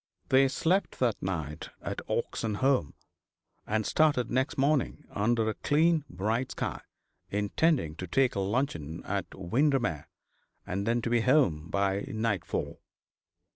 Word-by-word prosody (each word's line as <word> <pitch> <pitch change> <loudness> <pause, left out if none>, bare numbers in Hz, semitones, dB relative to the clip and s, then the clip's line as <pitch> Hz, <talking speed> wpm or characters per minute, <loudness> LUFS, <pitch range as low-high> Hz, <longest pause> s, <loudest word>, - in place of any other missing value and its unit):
They 135 +1 +6
slept 175 +9 0
that 120 -4 0
night 80 -5 -4
at - - -4
Oxenholme, 115 - 0 0.7
and 110 0 0
started 145 -7 +2
next 130 +2 0
morning, 140 0 +1
under 110 +2 +1
a 110 - +1
clean, 155 +3 +2
bright 110 +8 -1
sky, - - -3 0.5
intending 105 - +1
to 90 - -5
take 130 +9 +2
luncheon 95 - -2
at 100 0 -3
Windermere, 120 - 0 0.6
and 100 +3 -3 0.2
to - - -1
be 120 0 +3
at 115 - -2
home 95 - +3
by 100 +2 0
nightfall. 110 -5 -2
110 Hz, 125 wpm, -29 LUFS, 95-135 Hz, 0.7 s, They